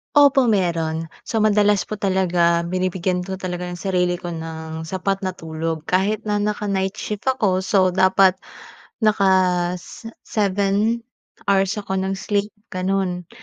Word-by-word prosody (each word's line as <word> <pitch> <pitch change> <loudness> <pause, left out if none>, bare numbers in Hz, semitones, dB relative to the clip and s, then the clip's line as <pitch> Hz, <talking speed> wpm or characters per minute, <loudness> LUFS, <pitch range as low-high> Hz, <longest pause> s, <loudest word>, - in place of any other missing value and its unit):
Opo, 280 -3 +6
meron. 165 -6 0 0.2
So, 225 -2 -1
madalas 210 -2 +3
po 215 - -3
talaga, 180 -3 +2
binibigyan 185 0 -1
ko 190 - -5
talaga 180 -1 -4
yung 175 -1 -7
sarili 180 -2 +1
ko 175 0 -5
ng 160 -1 -6
sapat 190 +3 -2
na 185 - -1
tulog. 160 -1 -4
Kahit 200 +4 +1
na 210 -1 -1
naka-night 205 -2 -1
shift 210 +1 -5
ako, 200 -8 +1
so 190 -2 +3
dapat 190 0 +4 0.7
naka-s 185 -1 +1 0.2
seven 205 +3 0 0.4
hours 195 +1 +2
ako 190 -2 -2
ng 190 0 -2
sleep 205 +1 -1 0.2
ganun. 185 -2 -1
190 Hz, 135 wpm, -21 LUFS, 180-205 Hz, 0.7 s, Opo